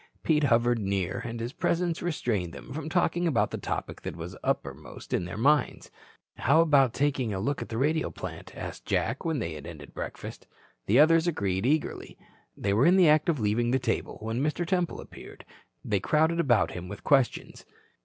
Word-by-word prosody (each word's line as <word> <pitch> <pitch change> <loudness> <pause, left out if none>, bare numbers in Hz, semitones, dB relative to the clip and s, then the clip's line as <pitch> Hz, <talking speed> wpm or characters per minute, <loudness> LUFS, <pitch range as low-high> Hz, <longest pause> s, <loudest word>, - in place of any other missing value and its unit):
Pete 150 -2 +3
hovered 120 -1 +3
near 95 -2 -1
and 115 -1 -5
his 120 +3 -4
presence 170 -1 0
restrained 115 - -2
them - - -9
from 155 +1 -5
talking 175 0 +1
about 145 -8 +1
the - - -4
topic - - -4
that - - -5
was 85 +2 -7
uppermost - - -4
in 90 - 0
their 90 - -6
minds. 145 +6 +1 0.5
"How 150 +5 +4
about 140 -7 +4
taking 135 -4 0
a 95 - -2
look 135 +8 -1
at - - -6
the 115 - -4
radio 155 +5 +1
plant?" - - -8
asked - - -7
Jack 120 +5 0
when 160 -2 -1
they 85 - -3
had 75 -2 -8
ended 75 -4 -10
breakfast. - - -7 0.4
The 110 - +4
others 165 +3 +5
agreed 100 - 0
eagerly. 155 +2 -1 0.4
They 100 - 0
were 115 +9 +4
in 180 - +6
the 180 -4 +6
act 155 +2 +4
of 155 -5 +1
leaving 110 +3 +1
the 130 - +3
table - - -2
when 115 +3 -2
Mr. 155 +4 -1
Temple 180 -1 -1
appeared. - - -12 0.4
They 100 -2 +1
crowded 160 - +2
about 125 -9 +3
him 90 0 -7
with 100 +2 -8
questions. 135 -4 +1
130 Hz, 195 wpm, -28 LUFS, 105-160 Hz, 0.5 s, in